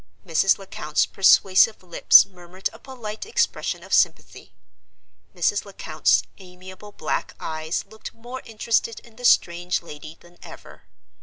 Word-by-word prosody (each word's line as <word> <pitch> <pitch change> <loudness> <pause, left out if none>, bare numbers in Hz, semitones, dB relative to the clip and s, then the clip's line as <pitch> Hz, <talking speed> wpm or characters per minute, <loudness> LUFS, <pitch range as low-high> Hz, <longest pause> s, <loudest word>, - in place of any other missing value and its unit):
Mrs. 180 +4 +2
Lecount's 155 -6 -2
persuasive 195 +1 +4
lips 175 -2 +6
murmured 180 0 -7
a - - -14
polite 230 -5 -8
expression 445 - -2
of - - -8
sympathy; - - 0 0.8
Mrs. - - 0
Lecount's - - 0 0.2
amiable 185 +2 -13
black 160 - -4
eyes 160 +1 -4
looked 220 - -11
more 245 +3 -9
interested 225 0 -1
in 230 -2 -20
the 245 - -7
strange 175 -4 +2
lady 155 0 -11
than 175 0 -21
ever. - - -14
185 Hz, 130 wpm, -23 LUFS, 175-220 Hz, 0.8 s, lips